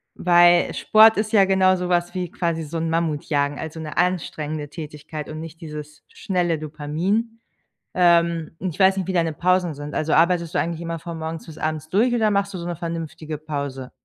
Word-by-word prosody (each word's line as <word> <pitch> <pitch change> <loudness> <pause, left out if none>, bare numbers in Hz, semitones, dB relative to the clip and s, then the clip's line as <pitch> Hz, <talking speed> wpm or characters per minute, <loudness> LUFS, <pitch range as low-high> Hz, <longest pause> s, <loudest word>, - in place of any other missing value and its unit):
weil 175 0 +5
Sport 220 +1 +6
ist 215 +1 -1
ja 200 -4 +5
genau 190 -1 +4
so 180 -1 -3
was 175 -1 +1
wie 180 -2 -2
quasi 170 -2 -2
so 155 +2 -5
'n 165 0 -1
Mammutjagen, 150 -3 0
also 160 0 -6
'ne 155 -1 -7
anstrengende 155 -4 -1
Tätigkeit 150 0 -8
und 155 0 -6
nicht 165 +1 -10
dieses 150 -1 -9
schnelle 175 -5 -1
Dopamin. 165 +10 -2 0.6
Ähm, 170 -2 +3
ich 185 -5 -4
weiß 190 0 +5
nicht, 190 -1 -3
wie - - 0
deine 165 -3 +1
Pausen 180 0 +1
sind. 145 +1 -7
Also, 155 0 -1
arbeitest 170 0 +2
du - - +1
eigentlich 165 0 -2
immer 165 0 -4
von 170 0 -7
morgens 160 0 -5
bis 160 -1 -11
abends 155 0 -3
durch 225 +8 +2
oder 220 -3 +2
machst 200 -1 0
du 185 - -4
so 170 - -6
'ne 175 -1 -3
vernünftige 160 -2 -5
Pause? 140 -4 -5
165 Hz, 195 wpm, -22 LUFS, 155-180 Hz, 0.6 s, Sport